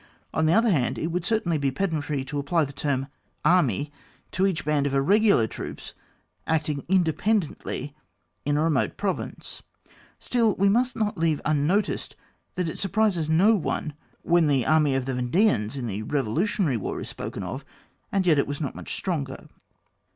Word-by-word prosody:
On 160 Hz, 0 st, +2 dB
the 160 Hz, -, +4 dB
other 225 Hz, +2 st, +4 dB
hand, 135 Hz, -9 st, +1 dB
it 160 Hz, -, -2 dB
would 175 Hz, 0 st, -1 dB
cer 220 Hz, +4 st, +1 dB
tainly 165 Hz, -4 st, -1 dB
be 140 Hz, -, +2 dB
pedantry 150 Hz, -3 st, -2 dB
to 145 Hz, +2 st, -3 dB
apply 155 Hz, +3 st, +1 dB
the 140 Hz, -, -9 dB
term 135 Hz, -1 st, -1 dB, 0.4 s
Army 145 Hz, -, +3 dB, 0.4 s
to 190 Hz, +1 st, +2 dB
each 185 Hz, -5 st, -2 dB
band 145 Hz, -2 st, +1 dB
of 140 Hz, -, -3 dB
irreg^ar 190 Hz, -, +4 dB
troops -, -, -8 dB, 0.5 s
acting 150 Hz, -3 st, 0 dB
independently 175 Hz, -, 0 dB, 0.5 s
in 145 Hz, 0 st, +1 dB
a 150 Hz, -, +2 dB
remote 160 Hz, -4 st, +1 dB
pro 200 Hz, -2 st, +1 dB
vince: -, -, -8 dB, 0.6 s
still 230 Hz, -5 st, +1 dB
we 200 Hz, +1 st, +3 dB
must 245 Hz, +5 st, +2 dB
not 210 Hz, -4 st, -1 dB
leave 160 Hz, -3 st, +2 dB
unnoticed 155 Hz, +7 st, 0 dB, 0.4 s
that 180 Hz, -2 st, -1 dB
it 160 Hz, -, -5 dB
surprises 195 Hz, -5 st, +1 dB
no 185 Hz, +8 st, +5 dB
one 165 Hz, -5 st, -2 dB, 0.3 s
when 170 Hz, -2 st, +3 dB
the 135 Hz, -4 st, +2 dB
Army 155 Hz, -3 st, +3 dB
of 135 Hz, -1 st, -1 dB
the 135 Hz, -, -2 dB
Yendeans 125 Hz, -, +1 dB
in 130 Hz, -, -3 dB
the 105 Hz, -2 st, -3 dB
Bevolutionary 145 Hz, -, 0 dB
War 105 Hz, -, -4 dB
is -, -, -6 dB
spoken -, -, -6 dB
of, -, -, -5 dB, 0.5 s
and 195 Hz, -2 st, +1 dB
yet 160 Hz, -5 st, +4 dB
it -, -, +1 dB
was 145 Hz, +1 st, -4 dB
not 145 Hz, -4 st, -3 dB
much -, -, -6 dB
stronger. 145 Hz, -8 st, -4 dB
155 Hz, 175 wpm, -25 LUFS, 140-190 Hz, 0.6 s, no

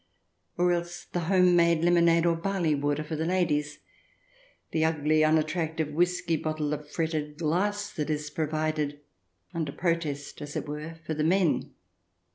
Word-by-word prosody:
Or 175 Hz, 0 st, +3 dB
else 175 Hz, 0 st, -3 dB
the 175 Hz, -, -3 dB
home 180 Hz, -2 st, +5 dB
made 170 Hz, -1 st, +4 dB
lemonade 170 Hz, -1 st, +4 dB
or 170 Hz, -1 st, +3 dB
barley 175 Hz, -2 st, 0 dB
water 145 Hz, +1 st, 0 dB
for 155 Hz, +1 st, -4 dB
the 155 Hz, -, -2 dB
ladies; 160 Hz, -4 st, 0 dB, 0.9 s
the 160 Hz, -, +1 dB
ugly, 155 Hz, -1 st, +2 dB
unattractive 155 Hz, 0 st, +1 dB
whisky 175 Hz, 0 st, +1 dB
bottle 155 Hz, -1 st, -2 dB
of 150 Hz, 0 st, -6 dB
fretted 155 Hz, -2 st, -2 dB
glass 200 Hz, +6 st, 0 dB
that 150 Hz, 0 st, -3 dB
is 150 Hz, 0 st, -2 dB
provided, 155 Hz, -1 st, -1 dB, 0.5 s
under 160 Hz, -4 st, -2 dB
protest 160 Hz, -4 st, -2 dB
as 145 Hz, 0 st, -7 dB
it -, -, -3 dB
were, 150 Hz, +2 st, -6 dB
for 160 Hz, -, -2 dB
the 155 Hz, 0 st, -1 dB
men 160 Hz, -6 st, +1 dB
160 Hz, 150 wpm, -28 LUFS, 150-170 Hz, 0.9 s, home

